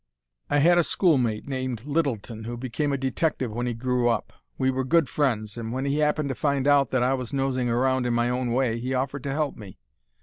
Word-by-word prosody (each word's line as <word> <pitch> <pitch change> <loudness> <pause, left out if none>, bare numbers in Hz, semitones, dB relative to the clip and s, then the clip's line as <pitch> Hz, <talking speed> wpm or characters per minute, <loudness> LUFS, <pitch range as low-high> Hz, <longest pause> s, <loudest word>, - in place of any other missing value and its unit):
"I 145 - +2
had 175 +4 +5
a - - +4
schoolmate 130 - +1
named 130 -3 -3
Littleton 125 -8 -2
who 120 +1 -5
became 130 +4 -2
a 140 - 0
detective 135 -2 -1
when 120 +3 -2
he 120 - -2
grew 125 0 +1
up. 115 - -1 0.2
We 130 - +2
were 130 0 -1
good 160 +2 +3
friends, 115 -7 -1
and 115 -1 -4
when 130 +3 -2
he 140 +2 0
happened 150 -1 +1
to - - -1
find 140 0 0
out 140 -2 +4
that 130 -2 +1
I 130 +2 +2
was 130 -2 -4
nosing 135 -2 0
around 130 +1 +1
in 120 - 0
my 120 0 +2
own 125 0 -1
way 120 -2 +1
he 130 +2 -2
offered 135 +2 -2
to 140 - -1
help 145 0 -1
me. 100 -4 -11
130 Hz, 230 wpm, -25 LUFS, 120-140 Hz, 0.2 s, had